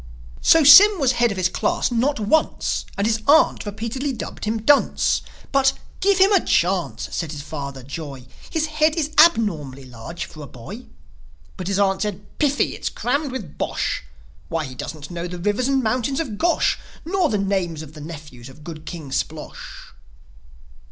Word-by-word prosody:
So 325 -1 +6
Sym 385 +8 +9
was 265 -4 +3
head 240 -1 +2
of 200 - -5
his 185 -1 +2
class 185 - -1
not 245 +3 +1
once; 230 +10 0
And 200 - 0
his 220 0 +1
aunt 295 -6 +4
repeatedly 230 +7 -3
dubbed 230 - -6
him 220 0 -2
"Dunce." 290 +3 +3 0.3
But, 270 -1 +3 0.3
"Give 395 -1 +3
him 385 +2 +5
a 390 -4 +4
chance," 180 0 0
said 165 -3 -3
his 145 -2 -7
father, 140 -2 -6
Joi. 140 -2 -7 0.2
"His 315 -1 0
head 310 0 +1
is 310 -3 -1
abnormally 165 - +3
large 125 +7 -7
for 155 - -12
a 145 - -8
boy." 185 - -10 0.7
But 180 - -6
his 195 0 0
aunt 195 -1 +2
said, 205 -1 -3
"Piffie! 290 -1 +1
It's - - -4
crammed 280 +3 -2
with 210 - -7
bosh! - - -2 0.5
Why, 165 -1 -2
he 130 - -8
don't 145 +4 -7
know 175 0 -4
the 180 0 -7
rivers 205 +7 0
and 270 -1 +1
mountains 250 +4 0
of 240 -11 -4
Gosh, 345 0 +2 0.3
Nor 355 -1 +1
the 210 - 0
names 190 -5 -1
of 155 -1 -12
the 155 - -11
nephews 150 -6 -10
of 150 +3 -15
good 155 -1 -9
King 160 -6 -7
Splosh!" - - -5
205 Hz, 180 wpm, -22 LUFS, -, 0.7 s, Sym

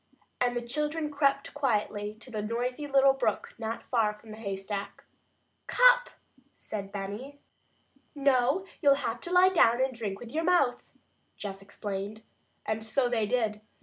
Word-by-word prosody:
And 245 -1 +1
the 240 - -2
children 300 +3 -1
crept 280 -1 +1
quietly 210 -6 -1
to 255 - -10
the 215 -2 -2
noisy 245 +6 -2
little 275 -1 +5
brook 240 -6 -1
not 225 0 -4
far 220 -4 +1
from 215 +1 -14
the 215 - -8
haystack. 200 -1 -5 0.6
"Cup," - - +5 0.5
said 200 -2 -6
Benny. 205 +8 -6 0.8
"No, 275 +5 +2 0.2
you'll 280 -3 +6
have 230 -3 -3
to 350 - -6
lie 365 +1 +6
down 240 -10 +4
and 260 0 +1
drink 210 -5 -4
with 235 -1 -9
your 320 +3 -1
mouth," 330 -8 +2 0.5
Jess 195 -1 -6
explained. 200 +2 -5 0.4
And 220 0 -2
so 245 +3 +1
they 225 -3 +1
did. 220 -3 0
240 Hz, 150 wpm, -29 LUFS, 210-280 Hz, 0.8 s, you'll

